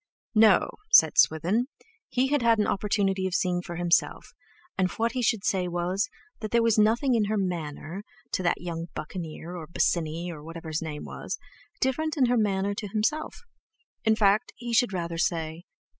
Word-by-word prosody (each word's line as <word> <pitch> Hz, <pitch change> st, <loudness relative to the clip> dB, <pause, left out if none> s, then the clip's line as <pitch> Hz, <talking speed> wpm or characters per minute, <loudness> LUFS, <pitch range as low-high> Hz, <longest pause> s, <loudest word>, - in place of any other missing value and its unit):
"No," 220 Hz, -1 st, +5 dB, 0.2 s
said -, -, +6 dB
Swithin, 185 Hz, +10 st, +3 dB, 0.4 s
"he 260 Hz, +2 st, +1 dB
had 290 Hz, -1 st, +2 dB
had 230 Hz, -1 st, +4 dB
an 210 Hz, -, +2 dB
opportunity 195 Hz, -1 st, 0 dB
of 185 Hz, -, -3 dB
seeing 180 Hz, -1 st, +1 dB
for 175 Hz, -1 st, -7 dB
himself, 175 Hz, 0 st, +1 dB, 0.4 s
and 185 Hz, -1 st, +1 dB
what 230 Hz, +1 st, 0 dB
he 255 Hz, +1 st, -2 dB
should 225 Hz, -3 st, +1 dB
say 185 Hz, -2 st, +1 dB
was, 175 Hz, +4 st, -1 dB, 0.3 s
that 215 Hz, -, -4 dB
there 235 Hz, +1 st, +3 dB
was 230 Hz, -2 st, +3 dB
nothing 235 Hz, +5 st, +3 dB
in 225 Hz, -3 st, +3 dB
her 215 Hz, +1 st, -1 dB
manner 175 Hz, -1 st, -3 dB, 0.3 s
to -, -, -1 dB
that 175 Hz, -, +1 dB
young 170 Hz, -1 st, -4 dB
Buccaneer 165 Hz, +1 st, -6 dB
or 165 Hz, -3 st, -7 dB
Bosinney 170 Hz, +1 st, 0 dB
or 155 Hz, -3 st, -9 dB
whatever 165 Hz, 0 st, -8 dB
his 155 Hz, 0 st, -2 dB
name 150 Hz, -2 st, -5 dB
was, -, -, -5 dB, 0.4 s
different 310 Hz, +4 st, 0 dB
from 275 Hz, -4 st, +4 dB
her 245 Hz, 0 st, +2 dB
manner 200 Hz, -2 st, +1 dB
to 205 Hz, +1 st, -5 dB
himself; 225 Hz, -, -2 dB, 0.6 s
in 220 Hz, -1 st, +4 dB
fact, 215 Hz, +2 st, +3 dB
he 240 Hz, -1 st, -5 dB
should 235 Hz, -1 st, +3 dB
rather 170 Hz, -3 st, -3 dB
say...." 165 Hz, -1 st, -1 dB
195 Hz, 180 wpm, -27 LUFS, 170-225 Hz, 0.6 s, said